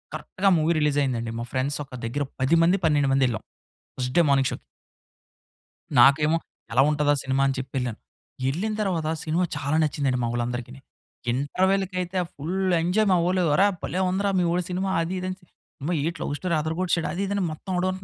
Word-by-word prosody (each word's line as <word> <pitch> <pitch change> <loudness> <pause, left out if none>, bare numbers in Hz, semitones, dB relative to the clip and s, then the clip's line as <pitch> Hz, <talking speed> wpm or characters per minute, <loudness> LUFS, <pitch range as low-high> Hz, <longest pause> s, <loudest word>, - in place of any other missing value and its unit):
కరెక్ట్‌గా 195 0 0
movie 160 +2 +2
release 150 -1 +1
అయింది 130 -3 0
అండి. 115 -1 -4
మా - - -4
ఫ్రెండ్స్ 135 +3 -1
ఒక 135 - -19
దగ్గర 140 +5 -2 0.2
10 135 +6 +3
మంది, 180 +4 +4
12 145 -3 +3
మంది 135 0 +3
వెళ్ళాం 115 - -3 0.6
ఫస్ట్ 125 0 -2
డే 170 - +7
మార్నింగ్ 135 -1 +3
షోకి. - - -7 1.4
నాకేమో 150 +5 +5 0.4
ఎలా 125 +3 +5
ఉంటదా? 150 -1 +2
ఆ - - -3
సినిమా 135 +1 +1
అని 135 - +1
చెప్పి 130 +2 -6
యెళ్ళాను. 120 -3 -3 0.5
యెళ్ళిన 180 +11 -1
తర్వాత 170 -6 0 0.2
సినిమా 165 +3 +1
చాలా 145 +2 -1
నచ్చింది 145 -2 0
అండి 125 - 0
మా - - 0
ఓళ్ళందరికిని. 120 +2 -4 0.5
ఇంటర్వల్‌కైయితే 185 +6 0 0.2
ఫుల్ 160 +7 -4 0.3
ఎంజాయ్ 195 +6 +2
మా - - +5
వోళ్ళు. 185 +1 +1
"అరె! 195 +6 +5 0.2
భలే 185 - -2
ఉందిరా 200 +2 0
మీ 180 - +2
వోడు 180 +1 +1
సినిమా" 190 +2 -1
అది 165 +3 -2
ఇది 185 - -4
అని. 185 - -4 0.4
అమ్మా! 165 +6 -1
ఏంటి 165 +1 -2
లవ్ 145 - -2
స్టోరీ 180 -2 -1
అదర 160 +1 -2
కొట్టేసాడు. 175 -2 0
అది 185 - -3
ఇది 200 - -2
అని 200 - 0
మొత్తం 190 +5 -7
వాడు. 185 +1 +1
155 Hz, 195 wpm, -25 LUFS, 135-185 Hz, 1.4 s, డే